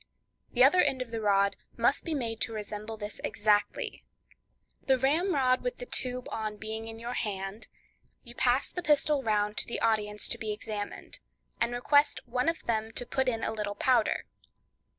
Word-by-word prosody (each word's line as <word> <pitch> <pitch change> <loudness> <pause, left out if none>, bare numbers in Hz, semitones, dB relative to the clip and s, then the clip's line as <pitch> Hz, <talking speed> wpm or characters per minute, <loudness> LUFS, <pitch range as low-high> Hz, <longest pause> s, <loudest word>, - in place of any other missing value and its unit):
The 250 - +5
other 300 +7 +6
end 265 -3 +1
of 235 - -17
the 225 -1 -3
rod 200 -1 +3 0.2
must - - +2
be 325 -2 -1
made 230 -5 -3
to 225 - 0
resemble 215 +1 -5
this 210 0 -7
exactly. 210 -1 0 0.8
The 265 -1 +5
ramrod 275 -2 +2
with - - -3
the - - -5
tube 250 - -2
on 215 -1 -3
being 220 +1 -5
in 225 0 -7
your 235 +2 -5
hand, 195 -1 -3 0.6
you 240 - -10
pass 250 +1 +2
the 355 - -3
pistol 295 -2 +3
round 210 -3 0
to - - +1
the 235 - -3
audience 210 -2 +1
to - - -2
be 215 -1 -3
examined, 210 -1 -5 0.4
and 235 0 +2
request 285 +4 +3
one 250 +5 +1
of 330 - -3
them 220 -1 -1
to 245 - -1
put 265 +1 +1
in 225 -2 -2
a - - -1
little 210 -2 -3
powder. 240 0 +2
230 Hz, 180 wpm, -29 LUFS, 215-265 Hz, 0.8 s, other